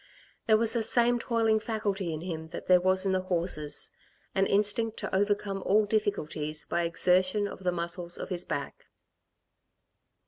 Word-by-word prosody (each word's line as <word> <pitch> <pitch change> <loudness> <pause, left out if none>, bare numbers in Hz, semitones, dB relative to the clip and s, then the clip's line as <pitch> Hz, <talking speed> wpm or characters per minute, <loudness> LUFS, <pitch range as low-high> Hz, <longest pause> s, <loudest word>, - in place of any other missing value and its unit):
There 220 -1 +6
was 225 0 +4
the 235 - +1
same 240 +2 +2
toiling 225 -2 +1
faculty 210 -5 -2
in 155 -1 -5
him 160 -3 -5
that 160 - -8
there 180 -1 +5
was 185 +1 +3
in 195 - +1
the 185 0 +1
horses 170 -5 -1 0.4
an 195 0 +2
instinct 210 +2 +1
to - - -3
overcome 200 0 0
all 210 +3 +3
difficulties 155 -8 -1
by 170 - -1
exertion 185 +4 +2
of 190 - -9
the 180 - +1
muscles 170 0 -3
of - - -6
his 180 -2 -1
back. 140 -1 -5
190 Hz, 165 wpm, -28 LUFS, 175-215 Hz, 0.4 s, There